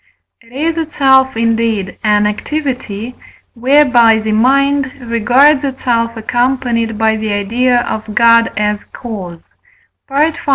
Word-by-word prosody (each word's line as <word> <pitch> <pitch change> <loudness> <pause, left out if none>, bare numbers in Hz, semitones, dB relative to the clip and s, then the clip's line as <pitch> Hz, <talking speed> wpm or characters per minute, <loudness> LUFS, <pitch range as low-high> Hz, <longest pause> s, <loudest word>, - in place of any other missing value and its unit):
it 230 +1 -22
is 315 +5 -2
itself, 265 -5 +2
indeed, 225 -3 -1
an 210 -1 +2
activity 245 -1 -4 0.4
whereby 245 -3 +3
the 220 0 -3
mind 270 +4 +1
regards 250 +5 +2
itself 235 -4 -2
accompanied 240 -1 -1
by 220 0 +1
the 215 -1 -3
idea 240 +5 0
of 220 -2 -5
God 230 0 +4
as 210 0 -1
cause 190 -8 -8 0.7
(V. 295 +4 +2
235 Hz, 115 wpm, -14 LUFS, 220-265 Hz, 0.7 s, God